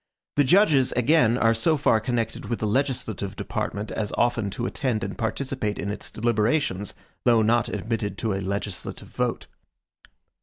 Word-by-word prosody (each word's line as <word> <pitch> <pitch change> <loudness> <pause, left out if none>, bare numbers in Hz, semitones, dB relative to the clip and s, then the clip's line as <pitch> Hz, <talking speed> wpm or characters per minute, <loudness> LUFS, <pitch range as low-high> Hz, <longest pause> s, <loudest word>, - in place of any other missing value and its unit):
The 145 - +5
judges, 145 -4 +4
again, 125 -1 +4
are 115 -1 +4
so 155 +8 +2
far 125 -5 +3
connected 115 0 -2
with 120 - -2
the - - -2
legislative 110 -4 -1
department 100 +2 -3
as 105 -2 -2
often 120 -4 +1
to 120 +5 -4
attend 125 -6 -1
and 95 0 -4
participate 120 -2 -2
in 100 - -3
its 105 - -6
deliberations, 110 -2 0 0.3
though 115 -2 +5
not 120 +2 +2
admitted 105 -2 -3
to 110 -3 -1
a 95 - -2
legislative 100 0 -4
vote. - - -2
115 Hz, 155 wpm, -25 LUFS, 105-125 Hz, 0.3 s, The